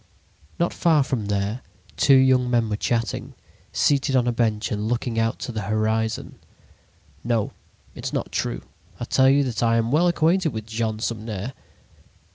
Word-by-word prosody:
Not 170 Hz, -, 0 dB
far 160 Hz, -4 st, +3 dB
from 130 Hz, -7 st, -3 dB
there, 100 Hz, +4 st, -1 dB, 0.3 s
two 135 Hz, -, +5 dB
young 130 Hz, -1 st, +4 dB
men 120 Hz, -2 st, +1 dB
were 105 Hz, -, 0 dB
chatting, 115 Hz, -1 st, -2 dB, 0.4 s
seated 135 Hz, -1 st, +2 dB
on 125 Hz, -2 st, +3 dB
a 120 Hz, -, +2 dB
bench 110 Hz, -3 st, 0 dB
and 105 Hz, +1 st, -2 dB
looking 120 Hz, -1 st, -1 dB
out 115 Hz, +2 st, +1 dB
into -, -, -6 dB
the 110 Hz, -2 st, -4 dB
horizon. 110 Hz, +2 st, -1 dB, 0.8 s
"No, 115 Hz, -2 st, 0 dB, 0.4 s
it -, -, -9 dB
is -, -, -3 dB
not -, -, -3 dB
true; -, -, -2 dB, 0.4 s
I -, -, -3 dB
tell 130 Hz, +2 st, +4 dB
you 140 Hz, +1 st, +4 dB
that 125 Hz, -4 st, -3 dB
I 115 Hz, -1 st, +3 dB
am 115 Hz, +1 st, 0 dB
well 165 Hz, +5 st, +4 dB
acquainted 170 Hz, -1 st, +2 dB
with 110 Hz, -1 st, -5 dB
Jean 110 Hz, -1 st, -2 dB
Sumner." 110 Hz, +1 st, -4 dB
115 Hz, 170 wpm, -23 LUFS, 110-130 Hz, 0.8 s, two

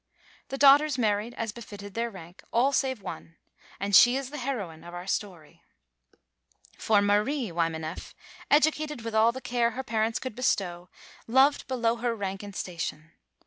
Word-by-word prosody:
The 270 Hz, -, -5 dB
daughters 285 Hz, +1 st, +6 dB
married 215 Hz, 0 st, 0 dB
as 230 Hz, -1 st, -3 dB
befitted 205 Hz, -3 st, -10 dB
their 235 Hz, +2 st, -1 dB
rank, 175 Hz, -4 st, -13 dB
all 245 Hz, +5 st, +3 dB
save 260 Hz, -5 st, -1 dB
one, 165 Hz, -3 st, -8 dB, 0.4 s
and 200 Hz, 0 st, +1 dB
she 245 Hz, +5 st, +8 dB
is 270 Hz, -1 st, -5 dB
the 295 Hz, -, -6 dB
heroine 210 Hz, -12 st, -4 dB
of 175 Hz, 0 st, -10 dB
the 175 Hz, +1 st, -7 dB
story. 185 Hz, -6 st, -5 dB, 1.1 s
For 210 Hz, -2 st, +2 dB
Marie 210 Hz, +3 st, +1 dB
Wymaneff, 165 Hz, -1 st, -3 dB, 0.3 s
educated 300 Hz, -3 st, +2 dB
with 230 Hz, -1 st, -5 dB
all 220 Hz, +1 st, +4 dB
the 260 Hz, +2 st, -8 dB
care 240 Hz, -1 st, +1 dB
her 265 Hz, -, -2 dB
parents 225 Hz, -2 st, 0 dB
could 255 Hz, -4 st, -6 dB
bestow, 180 Hz, -8 st, -1 dB, 0.4 s
loved 265 Hz, +5 st, +3 dB
below 235 Hz, -3 st, 0 dB
her 235 Hz, 0 st, -1 dB
rank 195 Hz, -2 st, -4 dB
and 200 Hz, -1 st, -9 dB
station. 170 Hz, -3 st, -5 dB
225 Hz, 160 wpm, -27 LUFS, 190-255 Hz, 1.1 s, she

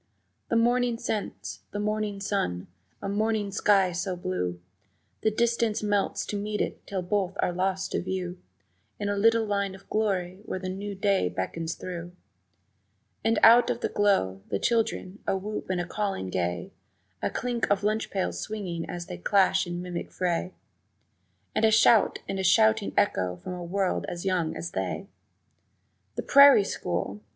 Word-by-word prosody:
The -, -, +1 dB
morning 240 Hz, +1 st, +2 dB
scents, 100 Hz, -, -4 dB
the -, -, -6 dB
morning 210 Hz, -1 st, -1 dB
sun, 145 Hz, -, -1 dB, 0.4 s
a -, -, -2 dB
morning 210 Hz, 0 st, 0 dB
sky 195 Hz, -2 st, +3 dB
so 180 Hz, +2 st, -2 dB
blue 90 Hz, -, -3 dB, 0.6 s
The 220 Hz, -, +3 dB
distance 230 Hz, -1 st, +1 dB
melts 205 Hz, -1 st, 0 dB
to 205 Hz, -, -3 dB
meet 210 Hz, 0 st, -3 dB
it -, -, -3 dB
till 190 Hz, -2 st, -3 dB
both 195 Hz, 0 st, -1 dB
are -, -, +1 dB
lost 190 Hz, +1 st, -1 dB
to -, -, 0 dB
view 180 Hz, -1 st, -4 dB, 0.6 s
In 205 Hz, -, -1 dB
a 205 Hz, -, 0 dB
little 225 Hz, +2 st, +4 dB
line 200 Hz, -2 st, -1 dB
of 195 Hz, -, -16 dB
glory 190 Hz, -3 st, -1 dB
where 205 Hz, -, -4 dB
the 185 Hz, 0 st, -4 dB
new 200 Hz, +2 st, -5 dB
day 195 Hz, -, +2 dB
beckons 160 Hz, -, -3 dB
through 175 Hz, -1 st, -7 dB, 1.1 s
And 225 Hz, 0 st, +2 dB
out 235 Hz, +2 st, +8 dB
of 235 Hz, -, -1 dB
the -, -, 0 dB
glow, 95 Hz, -, +1 dB
the 100 Hz, -, 0 dB
children: 215 Hz, -, 0 dB
a 195 Hz, -, +2 dB
whoop 210 Hz, +1 st, -5 dB
and 185 Hz, -1 st, 0 dB
a 175 Hz, -, -1 dB
calling 195 Hz, -, -3 dB
gay, 90 Hz, -1 st, -2 dB, 0.5 s
A -, -, 0 dB
clink 245 Hz, -1 st, -2 dB
of 200 Hz, 0 st, +2 dB
lunch 215 Hz, +2 st, 0 dB
pails 190 Hz, -2 st, -2 dB
swinging 185 Hz, -6 st, -4 dB
as 175 Hz, -1 st, -5 dB
they 90 Hz, -, -7 dB
clash 190 Hz, -, +3 dB
in 175 Hz, 0 st, -4 dB
mimic 175 Hz, -1 st, -5 dB
fray, 180 Hz, 0 st, -1 dB, 1.0 s
A 220 Hz, +1 st, +4 dB
shout 220 Hz, 0 st, +5 dB
and 195 Hz, -, -3 dB
a -, -, -1 dB
shouting 220 Hz, +2 st, +4 dB
echo 90 Hz, -, +2 dB
from 90 Hz, -, -7 dB
a 180 Hz, -1 st, -6 dB
world 190 Hz, +2 st, -1 dB
as 175 Hz, +2 st, -6 dB
young 175 Hz, -4 st, 0 dB
as 170 Hz, -, -5 dB
they! -, -, -3 dB, 1.1 s
The -, -, -3 dB
prairie 280 Hz, -6 st, +8 dB
school! 95 Hz, -, -3 dB
195 Hz, 165 wpm, -27 LUFS, 175-210 Hz, 1.1 s, out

